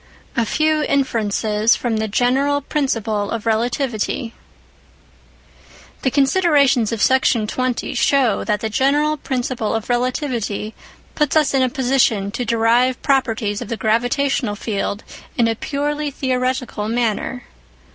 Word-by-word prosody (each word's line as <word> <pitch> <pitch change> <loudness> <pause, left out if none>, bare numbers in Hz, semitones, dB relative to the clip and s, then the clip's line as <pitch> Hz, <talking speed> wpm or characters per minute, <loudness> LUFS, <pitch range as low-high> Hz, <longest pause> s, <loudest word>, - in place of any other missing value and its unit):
A 230 -2 +1
FEW 310 +3 +1
INFERENCES 220 -6 +1
FROM 235 -3 -2
THE 220 0 -1
GENERAL 270 +6 +1
PRINCIPLE 225 -8 -1
OF 230 -1 -4
RELATIVITY 230 0 -1 1.7
The 260 - +1
considerations 280 - +3
of 225 -2 -1
Section 260 -4 +3
20 255 +4 -2
show 260 -3 +2
that 210 -2 -1
the 220 - -2
general 290 +6 +2
principle 250 -5 -2
of 225 +1 -4
relativity 240 -4 -2 0.4
puts 300 -1 0
us 305 -3 +3
in 270 - +3
a 255 - +2
position 245 -7 +1
to 245 - -3
derive 235 +2 +2
properties 225 -7 0
of - - -5
the 230 - -4
gravitational 245 +1 0
field 205 -1 -3 0.3
in 235 -2 +3
a 225 - +1
purely 290 +5 -2
theoretical 255 -4 -2
manner. 240 +1 -1
245 Hz, 125 wpm, -19 LUFS, 220-275 Hz, 1.7 s, considerations